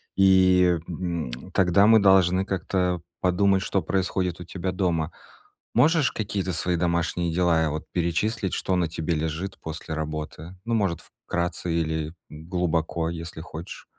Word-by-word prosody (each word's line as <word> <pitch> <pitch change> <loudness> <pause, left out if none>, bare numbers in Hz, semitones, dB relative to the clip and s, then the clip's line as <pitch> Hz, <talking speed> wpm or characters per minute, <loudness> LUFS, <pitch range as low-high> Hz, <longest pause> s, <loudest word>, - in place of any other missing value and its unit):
И, 95 -2 +5
м, 85 -6 -3 0.2
тогда 95 +1 +4
мы 110 -1 +7
должны 95 -1 +4
как-то 90 -2 -1 0.2
подумать, 95 +1 +3
что 95 0 0
происходит 95 -2 -1
у 90 - -8
тебя 95 +1 -3
дома. 85 -3 0 0.6
Можешь 160 -2 +4
какие-то 100 -4 -2
свои 90 +1 0
домашние 85 0 0
дела, 85 -2 +3
э, 80 - +1
вот 75 +1 -4
перечислить, 95 +4 -1
что 95 - 0
на 85 -2 +1
тебе 80 +1 -2
лежит 80 +5 -3
после 80 0 -6
работы? 80 +2 -5
Ну, 115 - -1
может, 95 -6 0 0.3
вкратце 90 0 -2
или 80 -1 -1 0.2
глубоко, 80 0 -1
если 85 -1 -6
хочешь? 80 +2 -9
90 Hz, 140 wpm, -25 LUFS, 80-95 Hz, 0.6 s, мы